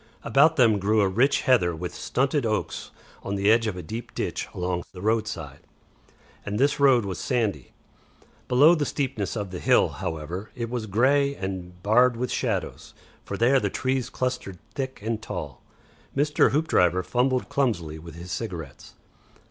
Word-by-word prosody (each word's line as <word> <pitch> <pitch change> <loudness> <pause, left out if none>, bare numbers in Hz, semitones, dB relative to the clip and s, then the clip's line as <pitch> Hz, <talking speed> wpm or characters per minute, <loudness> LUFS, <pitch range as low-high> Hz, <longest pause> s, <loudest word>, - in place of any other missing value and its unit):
About 155 +4 +4
them 115 -7 +4
grew 105 +2 +2
a 100 - +3
rich 125 +9 +2
heather 90 - +3
with 90 +2 -5
stunted 135 +2 0
oaks 110 -2 -2 0.3
on 100 - -3
the 100 +2 +3
edge 115 0 +3
of 100 -4 -3
a 90 - -6
deep 115 +2 -7
ditch - - -3
along 90 -1 -2
the 90 - -10
roadside, 105 -9 -2 0.8
and 100 +1 -3
this 140 +4 +2
road 130 -6 +5
was 95 -2 -4
sandy; 120 -6 -1 0.8
below 145 +7 +6
the 155 -4 +1
steepness 130 -9 -2
of 100 -3 -4
the 90 - -5
hill, - - +4
however, 85 +6 -5
it 115 -1 -4
was 120 -3 -3
grey 140 +7 +2
and 90 -3 -6
barred 120 +3 +4
with 125 +1 -2
shadows, - - -3 0.3
for 100 - -5
there 125 +5 +4
the - - -1
trees 130 -1 -1
clustered 125 -7 -3 0.2
thick 130 -1 -4
and 110 0 -2
tall. 75 -10 -6 0.6
Mr. 150 +1 +3
Hoopdriver 90 - +2
fumbled 125 +3 0
clumsily 85 - -1
with 80 0 -11
his 85 +2 -9
cigarettes. 85 -7 -6
110 Hz, 165 wpm, -25 LUFS, 90-130 Hz, 0.8 s, below